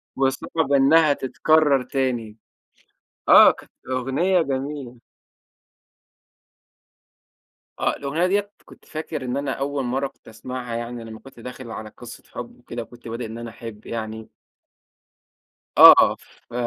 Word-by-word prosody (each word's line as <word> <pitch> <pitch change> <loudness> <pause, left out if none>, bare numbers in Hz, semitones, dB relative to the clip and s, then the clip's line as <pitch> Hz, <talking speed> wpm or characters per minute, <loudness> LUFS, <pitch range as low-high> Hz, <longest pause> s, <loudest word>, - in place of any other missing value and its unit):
وصعب 135 +3 -1
إنها 145 +3 +5
تتكرّر 140 0 +2
تاني." 125 -4 -2 0.9
آه، - - +9
كانت - - -15 0.2
أغنية 135 +9 +1
جميلة. 135 -3 -4 2.8
آه، - - +1
الأغنية 145 +5 -1
دِيّة 205 +2 0
كنت - - -17
فاكر 155 -3 -6
إن 125 +2 -2
أنا 140 -1 -2
أول 140 +1 -2
مرَّة 135 +3 -1
كنت 135 - -24
أسمَعها، 120 +1 -6
يعني 120 0 -5
لما 110 -1 -10
كنت 135 -3 -16
داخل 125 0 -9
على 110 -1 -7
قِصّة 120 +2 -12
حُب 120 0 -8
وكده 120 0 -7
وكنت 120 +1 -15
بادئ 115 +1 -5
إن 110 +1 -7
أنا 115 0 -7
أحِب 110 -2 -10
يعني. 110 -1 -6 1.5
آه، - - +9
ف - - -22
130 Hz, 125 wpm, -23 LUFS, 115-140 Hz, 2.8 s, آه